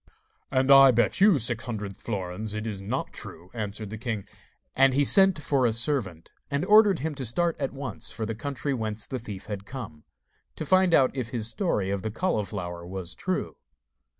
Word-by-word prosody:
'And 130 0 +2
I 135 0 +9
bet 120 +8 +2
you 200 -5 +6
six 115 -2 -1
hundred 105 -5 -5
florins 100 0 -5
it 110 +1 -4
is 105 -3 -4
not 100 - -3
true,' 90 +2 -9
answered 105 -2 -5
the 110 - -6
king. 110 -4 -4 0.5
And 135 -1 +4
he 145 +1 +3
sent 190 +3 +6
for 140 -2 +1
a - - +1
servant, 115 - -1 0.2
and 145 +4 -1
ordered 210 -4 +5
him 160 +1 -2
to 140 -2 -5
start 165 +8 0
at 135 -2 -2
once 135 -1 -3
for 110 - -4
the 115 - -3
country 140 +4 -3
whence 110 -3 -3
the 130 - -4
thief 105 -4 -8
had 100 -2 -6
come, 105 - -8 0.5
to 155 - -5
find 185 +1 +4
out 130 -1 +3
if 125 -4 -3
his 115 -3 -2
story 110 - 0
of 100 -1 -2
the 110 - -3
cauliflower 100 - -3
was 90 -1 -6
true. - - -3
115 Hz, 195 wpm, -26 LUFS, 105-140 Hz, 0.5 s, I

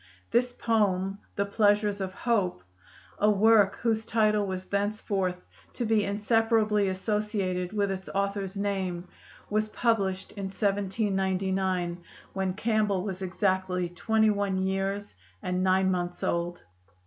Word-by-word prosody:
This 245 +1 +3
poem, 200 -5 0 0.2
'The 200 - +1
Pleasures 205 0 +2
of 190 -1 -2
Hope,' 200 - 0 0.6
a 210 - +4
work 210 -1 +5
whose 225 -2 +1
title 215 -2 +2
was 185 -1 -3
thenceforth 200 -2 -1 0.3
to 240 - -2
be 220 -1 +3
inseparably 215 0 +2
associated 190 -2 -1
with 205 -2 0
its 190 0 -5
author's 200 0 -2
name, 190 -3 -2 0.4
was 215 +1 0
published 200 -5 0
in 200 -2 -5
1799, 190 -2 0 0.3
when 190 -1 -1
Campbell 215 -3 +1
was 190 -2 -4
exactly 185 -1 0
twenty 220 +5 +2
one 200 -2 0
years 195 +2 -1 0.3
and 180 0 -1
nine 190 0 +3
months 175 -1 -3
old. 170 +1 -1
200 Hz, 125 wpm, -28 LUFS, 190-210 Hz, 0.6 s, work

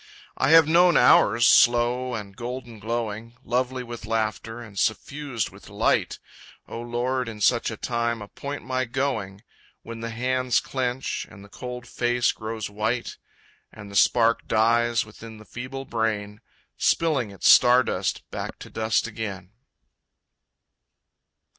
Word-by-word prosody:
I - - +1
have 165 -1 +7
known 175 +1 +5
hours, 120 -1 +5
slow 120 +2 +4
and 100 -3 -7
golden 120 -1 -7
glowing, 115 +1 -4
Lovely 125 +1 -1
with 120 -2 -8
laughter 115 +1 -2
and 105 -5 -8
suffused 135 +1 -2
with - - -15
light, - - +1 0.5
O 115 - -6
Lord, 120 +1 -2
in 110 -2 -9
such 115 +3 +2
a 110 - -6
time 115 0 -1
appoint 140 +7 -7
my 130 0 -1
going, 115 -6 -3 0.4
When 115 0 -8
the 115 0 -4
hands 125 +2 0
clench, 130 -1 -3
and 100 0 -13
the - - -17
cold 125 +2 -7
face 120 -1 +1
grows 110 -1 -5
white, 110 +4 -3 0.5
And 105 -2 -11
the - - -9
spark 115 +3 +3
dies 115 +1 +2
within 110 +1 -12
the 110 - -14
feeble 130 +4 -7
brain, 105 -3 -2 0.4
Spilling 150 -9 +1
its 100 - -2
star 125 +1 +7
dust - - -2
back - - -5
to - - -12
dust 110 0 0
again. 100 -5 -6
115 Hz, 140 wpm, -25 LUFS, 110-125 Hz, 0.5 s, have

